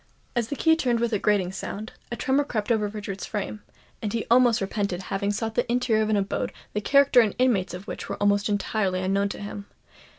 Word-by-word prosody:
As 235 -2 +1
the 285 - -3
key 320 +3 +4
turned 245 -7 +1
with 235 0 0
a 210 - +2
grating 195 -4 +2
sound, 205 +3 -6 0.2
a - - -1
tremor 270 +3 +1
crept 225 -6 -2
over 215 -2 +2
Richard's 205 -2 -6
frame; 210 0 -4 0.4
and 210 - -2
he 230 0 -2
almost 240 -2 +5
repented 195 -2 -2
having 200 +1 0
sought 220 +2 -2
the 245 +1 0
interior 240 -3 +2
of 215 - 0
an 215 - +3
abode 200 0 -1 0.2
the 210 - -1
character 275 +2 +5
and 215 -3 0
inmates 220 -8 +2
of 180 +2 -9
which - - -6
were 200 - -3
almost 205 +1 +2
entirely 200 -2 0
unknown 195 +1 +1
to - - -6
him. 205 0 -7
210 Hz, 220 wpm, -25 LUFS, 200-235 Hz, 0.4 s, almost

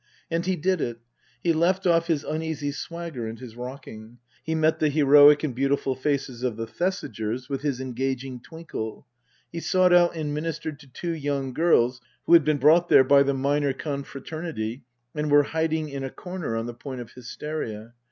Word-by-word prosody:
And 170 +2 -1
he 190 - +2
did 180 +1 0
it. 120 -1 -2 0.5
He 170 - +3
left 180 +4 +1
off 170 -1 +3
his 155 -4 0
uneasy 155 -2 -3
swagger 165 -5 -6
and 110 +1 -6
his 120 -2 -10
rocking. 120 -3 -9 0.3
He 160 - -2
met 160 0 +2
the 155 - +3
heroic 145 0 +7
and 145 -5 -1
beautiful 135 +1 0
faces 130 -2 -2
of 125 -4 -2
the 115 - -3
Thesigers 125 - -3
with 135 -1 -3
his 140 -4 -1
engaging 130 0 -3
twinkle. 130 -6 -7 0.5
He 170 - -4
sought 185 +1 +3
out 175 -1 +5
and 150 -2 -3
ministered 155 -1 -4
to 145 - -16
two 170 +6 -4
young 140 -4 -2
girls 125 -6 +3 0.2
who - - +3
had 170 -2 +8
been 155 0 +2
brought 160 +5 +5
there - - +7
by 140 +1 +5
the 140 0 +2
minor 140 +1 +1
confra 140 -1 -6
ternity 150 -7 -4 0.3
and 150 -1 -2
were 145 0 +6
hiding 160 0 -1
in 140 -1 -5
a 135 - -3
corner 180 -6 -5
on 115 - -2
the 120 - -5
point 130 +2 -7
of 120 -2 -8
hysteria. 120 -3 -6
145 Hz, 190 wpm, -25 LUFS, 130-160 Hz, 0.5 s, had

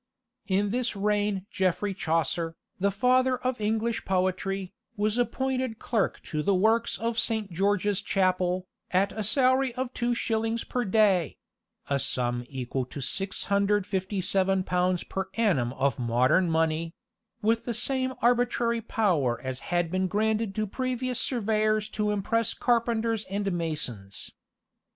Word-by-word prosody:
In 200 +1 +1
this 245 -1 -1
reign 205 -1 0
Geoffrey 190 +2 0
Chaucer, 165 -1 -1 0.2
"the 200 +2 +3
father 255 +5 +3
of 255 -2 -2
English 220 +2 0
poetry," 190 0 -1 0.2
was 210 +1 +1
appointed 255 0 -1
clerk 225 -3 -1
to 155 -2 -3
the 195 +5 +2
works 225 +5 +2
of 230 0 -1
Saint 220 -4 -1
George's 200 +2 +1
Chapel, 185 -2 +1 0.2
at 190 +2 +2
a 215 - -4
salary 260 +3 +3
of 255 0 -3
two 240 0 0
shillings 225 0 -1
per 245 -1 -2
day 195 -5 +3 0.5
(a 140 -1 +1
sum 120 -2 -1
equal 130 -1 -3
to 140 - -8
657 195 +3 0
pounds 180 0 +1
per 190 0 -4
annum 180 - +2
of 135 -2 0
modern 125 +9 +3
money), 165 +1 0 0.5
with 225 +2 +2
the 240 - -2
same 260 +2 0
arbitrary 240 -1 +2
power 160 - +1
as 130 -1 -4
had 175 -2 +1
been 185 0 +1
granted 215 +1 0
to 215 - 0
previous 255 +2 -2
surveyors 215 -3 +1
to 210 -1 -1
impress 220 +3 0
carpenters 230 -2 +1
and 200 0 -2
masons. 145 - -4
205 Hz, 135 wpm, -27 LUFS, 180-230 Hz, 0.5 s, the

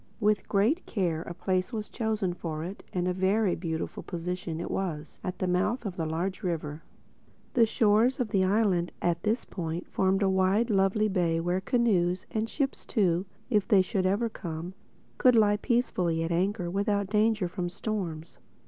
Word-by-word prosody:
With 210 -1 +1
great 225 - +2
care 175 -7 -1
a 170 - -6
place 185 +3 -1
was 215 -3 -4
chosen 215 -5 -1
for 160 -3 -4
it—and 180 0 -4
a 180 - +1
very 190 +1 +2
beautiful 160 -2 -4
position 175 -2 -4
it 170 - -4
was, 160 -5 -4
at 180 0 -4
the 185 - -1
mouth 200 +7 0
of 185 -3 -5
a 160 - 0
large 175 +4 -2
river. 160 -4 -3 0.7
The 230 -3 +5
shores 220 +5 +3
of 245 -3 0
the 195 -2 +2
island 185 -3 +2
at 170 -1 0
this 220 +4 0
point 170 0 -4
formed 195 +1 +1
a - - +3
lovely 195 +2 +2
wide 210 - -1
bay 170 -3 +1
where 175 +2 0
canoes—and 215 -1 +1
ships 275 0 -2
too, 185 -4 +1 0.2
if 210 -4 +2
they 195 -3 +5
should 185 0 0
ever 205 +5 +1
come—could 190 +6 -2
lie 210 -2 +5
peacefully 185 -9 0
at 165 - -2
anchor 185 +2 0
without 200 0 0
danger 215 -2 +2
from 175 0 -3
storms. 175 -5 -4
190 Hz, 165 wpm, -28 LUFS, 175-215 Hz, 0.7 s, The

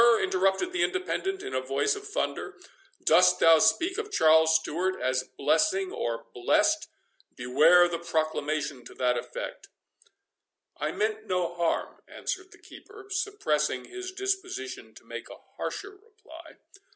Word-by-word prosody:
interrupted 190 - +1
the 360 - +1
Independent, 380 +1 -2
in - - -6
a 130 - 0
voice 135 - 0
of 410 0 -9
thunder, 415 - -3 0.5
"dost - - +5
thou 165 -1 +7
speak 365 - +2
of 425 -1 -5
Charles 160 - +5
Stewart 175 +4 0
as 130 0 0
blessing, 190 +5 +2
or 115 -1 -3
blessed?—beware 145 +6 +2
the 170 -1 -3
proclamation 155 -4 -2
to - - -12
that 125 -1 +1
effect." 120 - -6 1.1
"I 150 - -2
meant 215 +3 -2
no 180 -2 -1
harm," 170 -1 -2
answered 375 0 -5
the - - -16
keeper, 405 -1 -14
suppressing 155 - -1
his 370 0 -7
disposition 385 0 -4
to - - -16
make - - -8
a - - -10 0.2
harsher 405 0 -5
reply. 400 -6 -15
185 Hz, 135 wpm, -27 LUFS, -, 1.1 s, thou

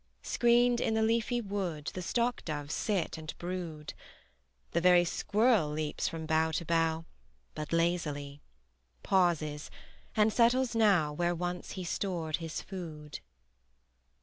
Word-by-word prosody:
Screened 240 0 +3
in 220 - +1
the 220 - +2
leafy 230 +2 +1
wood 190 -8 -3
The 185 - -4
stock 240 +6 0
doves 145 -2 -4
sit 195 -7 -1
and 155 0 -7
brood: 170 -4 -5 0.8
The 170 - +1
very 175 0 +6
squirrel 210 -1 +2
leaps 150 0 -2
from 160 -1 -4
bough 160 +1 +2
to 170 - -2
bough 165 0 +1 0.5
But 155 -1 -6
lazily; 150 -4 -1 0.6
pauses; 165 -6 +1 0.5
and 215 -1 +3
settles 245 +1 +3
now 195 -10 +3
Where 175 +3 0
once 175 +1 -4
he 185 - -5
stored 170 -3 -2
his 165 -2 -5
food. 160 -6 -7
175 Hz, 130 wpm, -31 LUFS, 155-210 Hz, 0.8 s, very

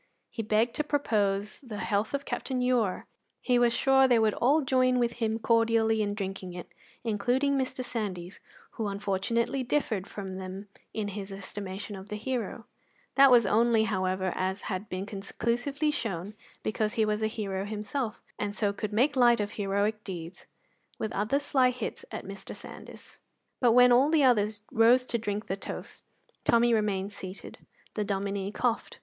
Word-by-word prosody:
He 225 - -3
begged 220 +2 +1
to 300 - +1
propose 210 -8 0
the 235 -6 -8
health 210 +4 0
of 280 - -4
Captain 260 -2 -2
Ure. 250 -6 +1 0.3
He 250 -1 +2
was 240 -1 +4
sure 265 +2 +4
they 245 -2 +4
would 220 -2 +3
all 285 +6 +3
join 255 -1 +3
with 235 -1 0
him 225 -1 0
cordially 225 -1 +3
in 205 -1 -1
drinking 190 -2 -5
it, 175 -1 -8 0.3
including 245 +6 +1
Mr. 260 -1 -2
Sandys, 190 -7 -4 0.3
who 220 - -3
unfortunately 205 +6 -1
differed 235 -7 -1
from 195 -2 -6
them 190 +2 -7 0.2
in 210 -2 -3
his 200 0 -6
estimation 195 +1 -6
of 190 +2 -10
the 210 - -3
hero; 230 0 -3 0.5
that 275 0 +7
was 240 -3 +6
only, 225 +2 +4
however, 185 -3 0
as 190 +2 -2
had 195 +1 -4
been 185 +1 -3
conclusively 240 +8 -1
shown, 205 - -3 0.3
because 215 0 -1
he 220 - +3
was 210 0 -1
a 220 - +2
hero 200 -4 -3
himself, 215 +3 -4 0.2
and 205 -1 -2
so 205 -2 0
could 210 +1 -4
make 255 +8 +2
light 240 -2 +5
of 205 0 -2
heroic 205 +1 -1
deeds 175 -2 -8 0.5
with 220 - -3
other 215 +8 +1
sly 265 -3 +3
hits 250 - -5
at - - -6
Mr. - - -7
Sandys. - - -11 0.4
But 240 -3 +4
when 250 0 +7
all 260 +4 +5
the 310 -2 +4
others 215 -4 +3
rose 240 +3 +5
to 235 -2 -1
drink 210 0 -3
the 190 - -2
toast, 195 - -8 0.4
Tommy 235 0 +4
remained 205 -2 0
seated. 190 0 -8 0.3
The 210 - -1
Dominie 200 0 -2
coughed. 235 +1 -1
215 Hz, 170 wpm, -29 LUFS, 200-245 Hz, 0.5 s, that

